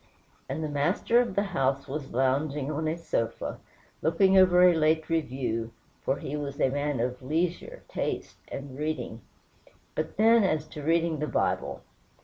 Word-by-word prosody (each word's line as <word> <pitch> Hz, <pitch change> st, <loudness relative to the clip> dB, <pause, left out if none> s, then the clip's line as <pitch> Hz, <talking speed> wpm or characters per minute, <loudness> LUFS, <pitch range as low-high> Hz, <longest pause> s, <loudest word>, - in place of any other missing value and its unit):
And 145 Hz, +4 st, -3 dB
the -, -, -1 dB
master 150 Hz, +11 st, +2 dB
of 235 Hz, -6 st, -3 dB
the 200 Hz, -, +2 dB
house 135 Hz, -8 st, 0 dB
was 140 Hz, 0 st, -5 dB
lounging 135 Hz, +3 st, 0 dB
on 155 Hz, +1 st, -2 dB
a 160 Hz, +2 st, -1 dB
sofa, 115 Hz, -8 st, -2 dB, 0.4 s
looking 190 Hz, +5 st, +3 dB
over 180 Hz, -1 st, +6 dB
a 180 Hz, -1 st, +7 dB
late 160 Hz, 0 st, +2 dB
review 125 Hz, -7 st, -1 dB, 0.3 s
for 135 Hz, -, 0 dB
he 145 Hz, -, -5 dB
was 140 Hz, -1 st, -5 dB
a -, -, +3 dB
man 145 Hz, -1 st, -1 dB
of 125 Hz, +1 st, -2 dB
leisure, 175 Hz, -, -2 dB
taste, -, -, -3 dB
and 135 Hz, -1 st, -7 dB
reading 150 Hz, -7 st, -3 dB, 0.7 s
but, 155 Hz, +2 st, -3 dB
then, 225 Hz, +1 st, +6 dB
as 155 Hz, -5 st, 0 dB
to 150 Hz, -, -8 dB
reading 165 Hz, 0 st, +1 dB
the 150 Hz, -, -1 dB
Bible! -, -, -1 dB
155 Hz, 160 wpm, -28 LUFS, 135-170 Hz, 0.7 s, a